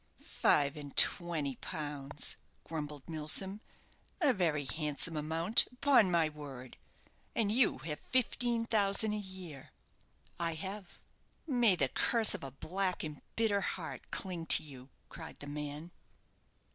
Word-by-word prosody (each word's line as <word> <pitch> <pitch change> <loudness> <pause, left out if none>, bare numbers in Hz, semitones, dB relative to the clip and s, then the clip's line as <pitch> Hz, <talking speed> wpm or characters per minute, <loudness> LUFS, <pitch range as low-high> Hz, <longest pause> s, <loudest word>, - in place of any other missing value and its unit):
"Five 140 -1 +3
and 145 -2 -9
twenty 155 -6 +2
pounds!" 145 -1 -1 0.3
grumbled 150 -3 -6
Milsom; 170 +6 0 0.6
"a 295 -7 +4
very 160 - 0
handsome 155 +2 -1
amount, 160 +7 +3
upon 250 -6 +4
my 170 -2 +3
word! 140 -4 -9 0.6
And 210 -3 +1
you 235 +1 +3
have 150 -2 -4
fifteen 240 -2 +1
thousand 210 -1 +4
a - - -1
year!" 185 -8 -9 0.7
"I 165 -1 0
have." 190 +3 -6 0.5
"May 240 - +4
the 140 -6 +2
curse 230 - +2
of - - -6
a 135 - -4
black 180 +7 -2
and 150 -2 -6
bitter 215 -3 +2
heart 175 -3 -5
cling 175 -3 -3
to - - +5
you!" 135 -3 -12 0.2
cried 160 -1 -9
the - - -8
man. 150 +3 -6
165 Hz, 135 wpm, -33 LUFS, 150-200 Hz, 0.7 s, to